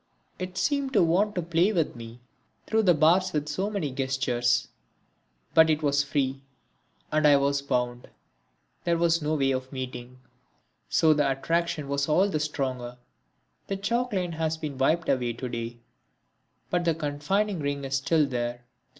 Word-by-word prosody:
It 185 0 -5
seemed 280 -2 0
to - - +5
want 195 +6 +2
to 180 - -1
play 170 +4 +2
with 165 - 0
me 115 +1 -10 0.4
through 220 0 +2
the 185 -5 +5
bars 170 +5 +3
with 150 -1 -1
so 185 +7 -2
many 190 -10 -2
gestures. 130 -2 0 0.9
But 160 0 +6
it 155 0 +1
was 145 -1 +3
free 135 -1 -1 0.7
and 155 0 +3
I 145 -1 +7
was 140 0 +1
bound 125 -3 -2 0.7
there 170 -1 +1
was 165 0 +2
no 150 +1 0
way 135 -2 +2
of 130 0 -3
meeting. 125 -1 -6 0.7
So 155 - +4
the 145 -2 +2
attraction 155 +2 -1
was 140 +1 -1
all 185 +6 +4
the 155 - -1
stronger. 130 -5 -3 0.7
The 195 - -2
chalk 235 +5 -1
line 180 -4 -1
has 160 0 -2
been 150 -4 -6
wiped 160 +5 +2
away 125 -2 +1
to 125 +2 -5
day, 120 0 -5 0.9
but 175 -1 +1
the 165 -2 +1
confining 165 +7 -1
ring 140 -1 -2
is 135 0 0
still 155 +3 +2
there. 120 -2 -3
150 Hz, 165 wpm, -27 LUFS, 130-170 Hz, 0.9 s, I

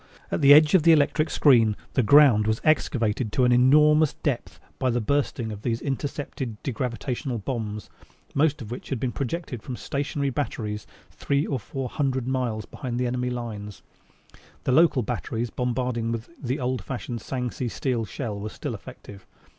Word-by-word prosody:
At - - -1
the 140 0 +7
edge 150 +1 +8
of 190 - +6
the 165 +2 +6
electric 155 +1 +2
screen 115 -7 +4 0.2
the 130 - +3
ground 120 -3 +6
was 110 0 +1
excavated 115 -7 +1
to 130 - +3
an 125 - +3
enormous 150 +4 +5
depth 135 -6 -3 0.2
by 130 - +1
the 120 0 +1
bursting 120 -2 -1
of 105 -1 -7
these 115 0 -1
intercepted 135 -3 -4
degravitated 125 -2 -3
bombs, 105 -5 -4 0.4
most 145 -2 +1
of 110 - -10
which 125 - -7
had 135 - -2
been 125 0 -1
projected 140 -2 -4
from 125 - -6
stationary 140 +1 -2
batteries 110 -6 -3 0.2
three 140 +1 0
or 135 - -2
four 130 +5 -5
hundred 130 -2 -1
miles 125 -5 -1
behind 120 -2 -5
the 125 - +1
enemy 125 0 -1
lines. 110 -4 -6 0.8
The - - 0
local 150 -3 +4
batteries 120 -1 -3
bombarding 125 -2 -1
with 115 0 -5
the 130 +1 -2
old 125 -4 -2
fashioned 120 0 -5
Sangsi 125 -1 -3
steel 125 -1 -1
shell 110 -1 -5
were 105 +2 -4
still - - -5
effective. 100 -2 -11
125 Hz, 170 wpm, -25 LUFS, 115-140 Hz, 0.8 s, edge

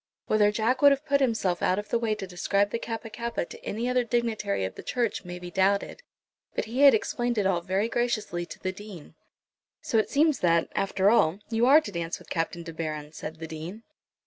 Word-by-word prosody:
Whether 210 -1 +3
Jack 225 +5 0
would 285 -1 +8
have 275 +2 0
put 280 -1 +2
himself 220 -8 +1
out 185 - +2
of 210 0 -5
the 235 - +1
way 225 -2 0
to 195 - -6
describe 200 +3 0
the 230 - -2
Kappa 225 -1 -5
kappa 235 -5 -3
to - - -12
any 230 +4 -3
other 250 0 +2
dignitary 230 - -1
of 95 - -5
the - - -9
Church 240 -5 -1
may 175 -1 -7
be 175 0 -8
doubted, 200 - +1 0.5
but - - -1
he 240 +5 -2
had 280 -4 +8
explained 240 +2 -1
it 205 - +1
all 180 -3 +2
very 190 +5 0
graciously 225 -7 -1
to 155 - -9
the 185 - -3
Dean. 190 -4 -11 0.7
"So 225 - +1
it 215 - 0
seems 305 0 +3
that, 170 -2 +2
after 195 0 +2
all, 185 -7 +3
you 230 +2 +3
are 295 +4 +8
to 210 - -7
dance 170 -2 -3
with - - -17
Captain 170 0 -2
De 165 -1 -8
Baron," 155 -2 -5
said 155 0 -7
the 160 - -6
Dean. 160 +7 -7
205 Hz, 225 wpm, -27 LUFS, 175-235 Hz, 0.7 s, would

